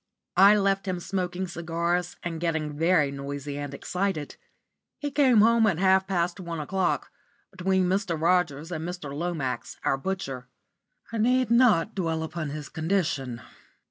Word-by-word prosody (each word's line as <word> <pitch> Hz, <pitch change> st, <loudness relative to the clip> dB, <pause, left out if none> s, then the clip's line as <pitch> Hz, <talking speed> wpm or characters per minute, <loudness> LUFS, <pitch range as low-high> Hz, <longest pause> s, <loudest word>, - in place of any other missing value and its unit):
I 200 Hz, +2 st, +8 dB
left 195 Hz, -1 st, +1 dB
him 180 Hz, -1 st, -1 dB
smoking 185 Hz, 0 st, -3 dB
cigars, 170 Hz, +1 st, -2 dB
and 165 Hz, -1 st, -4 dB
getting 160 Hz, -3 st, -1 dB
very 160 Hz, -2 st, +3 dB
noisy 140 Hz, +1 st, -5 dB
and 145 Hz, -1 st, -5 dB
excited. 180 Hz, +1 st, -3 dB, 0.6 s
He 290 Hz, -1 st, -4 dB
came 265 Hz, -6 st, +5 dB
home 230 Hz, 0 st, +5 dB
at 185 Hz, -6 st, +1 dB
half 190 Hz, +1 st, +3 dB
past 175 Hz, -1 st, -1 dB
one 170 Hz, -3 st, -5 dB
o'clock, 180 Hz, +4 st, -1 dB, 0.4 s
between 190 Hz, 0 st, +1 dB
Mr. 185 Hz, -3 st, 0 dB
Rogers 165 Hz, -2 st, +1 dB
and 160 Hz, -2 st, -3 dB
Mr. 175 Hz, -5 st, -5 dB
Lomax, 155 Hz, -4 st, -3 dB
our 135 Hz, -, +2 dB
butcher. 135 Hz, -8 st, -4 dB, 0.7 s
I 225 Hz, -, -1 dB
need 250 Hz, +1 st, +2 dB
not 225 Hz, -5 st, +4 dB
dwell 165 Hz, -4 st, -1 dB
upon 160 Hz, -1 st, -4 dB
his 150 Hz, 0 st, -6 dB
condition. 160 Hz, -8 st, -1 dB
175 Hz, 145 wpm, -26 LUFS, 155-190 Hz, 0.7 s, I